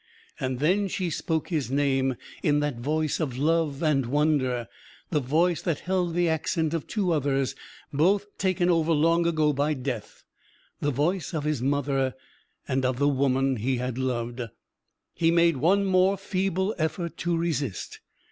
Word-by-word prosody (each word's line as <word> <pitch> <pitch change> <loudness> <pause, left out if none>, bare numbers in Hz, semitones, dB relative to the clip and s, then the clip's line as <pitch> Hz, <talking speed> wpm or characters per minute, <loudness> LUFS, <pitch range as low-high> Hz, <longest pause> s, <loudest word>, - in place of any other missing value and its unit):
And 130 -1 -2
then 185 +9 +2
she 180 -2 -2
spoke 160 +1 -2
his 155 -8 -1
name 135 -1 +1 0.3
in 145 -1 +2
that 145 -5 -2
voice 155 +4 -1
of 135 -7 -2
love 155 0 +1
and 140 -5 +2
wonder, 130 -4 +1 0.4
the 155 - +2
voice 160 +6 +1
that 165 -5 -2
held 180 -2 -1
the 175 0 +2
accent 160 0 0
of 165 - -3
two 200 -5 0
others 140 -3 +1 0.4
both 190 +8 +3
taken 185 -2 +1
over 165 -2 +3
long 165 +2 +3
ago 155 -3 +2
by 145 +2 0
Death 125 -5 -5 0.6
the 145 - 0
voice 160 +5 -1
of 150 - -1
his 150 -4 -1
mother, 135 -1 0 0.5
and 130 0 0
of 130 -1 0
the 145 +2 +2
woman 135 -1 +2
he 125 +4 0
had 125 0 -3
loved. 120 -1 -2 0.7
He 165 - +2
made 170 -2 +4
one 195 +8 +3
more 190 +1 +3
feeble 190 +1 -1
effort 170 +2 -2
to 170 -1 0
resist. 150 - -3
150 Hz, 160 wpm, -26 LUFS, 135-170 Hz, 0.7 s, made